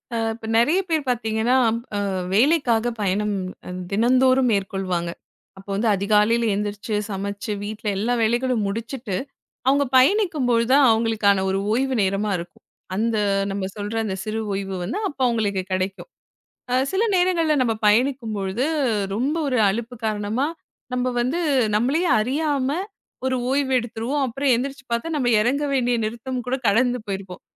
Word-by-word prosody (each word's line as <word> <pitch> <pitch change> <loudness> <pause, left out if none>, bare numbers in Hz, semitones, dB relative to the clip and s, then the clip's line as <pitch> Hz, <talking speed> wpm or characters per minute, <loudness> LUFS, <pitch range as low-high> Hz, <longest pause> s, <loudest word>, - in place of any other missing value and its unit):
அ. - - 0 0.2
இப்ப 225 0 -9
நெறையப் 315 +12 +3
பேரு 315 -2 +1
பாத்தீங்கன்னா, 225 0 +1 0.4
அ. - - 0 0.3
வேலைக்காக 240 -1 +3
பயணம் 205 +1 0 0.6
தினந்தோறும் 255 +4 +3
மேற்கொள்வாங்க. 190 -3 -2 0.5
அப்போ 195 +1 -13
வந்து 220 +4 0
அதிகாலையில 210 +4 +2
எந்திரிச்சு, 210 +1 -3
சமச்சு 200 +1 -4
வீட்ல 215 +1 -6
எல்லா 225 +5 0
வேலைகளும் 240 0 +1
முடிச்சிட்டு 230 0 -4 0.5
அவுங்க 280 +1 +4
பயணிக்கும்போதுதான், 270 - +3
அவுங்களுக்கான 220 -3 +2
ஒரு 190 - 0
ஓய்வு 265 +3 +1
நேரமா 195 +2 0
இருக்கும். 170 0 -10 0.3
அந்த 225 +3 0 0.3
நம்ம 195 0 -3
சொல்ற 205 +1 -4
அந்த 200 -3 -2
சிறு 215 +1 -3
ஓய்வு 195 0 -3
வந்து 375 - -3
அப்ப 285 - -10
அவுங்களுக்குக் 200 -5 -1
கெடைக்கும். 185 - -2 0.6
அ. - - +1 0.2
சில 385 +3 +1
நேரங்கள்ல 350 -4 +2
நம்ம 225 -2 0
பயணிக்கும்பொழுது, 220 -2 +1 0.5
ரொம்ப 265 +8 0
ஒரு 250 -3 +1
அலுப்பு 235 +4 -4
காரணமா 215 +5 -1 0.5
நம்ம 250 0 0
வந்து 260 +8 -1 0.4
நம்மளேயே 280 +11 +1
அறியாம 275 +2 0 0.6
ஒரு 260 0 +1
ஓய்வு 275 0 +1
எடுத்துருவோம். 240 +4 -2
அப்பறம் 270 +2 +1
எந்திரிச்சு 270 +3 -4
பாத்தா, 235 +7 -1
நம்ம 265 -4 0
எறங்கவேண்டிய 260 0 +1
நிறுத்தம்கூட 245 +3 -3
கடந்து 245 +4 +2
போயிருக்கும். 190 -2 -6
230 Hz, 130 wpm, -23 LUFS, 205-260 Hz, 0.6 s, அவுங்க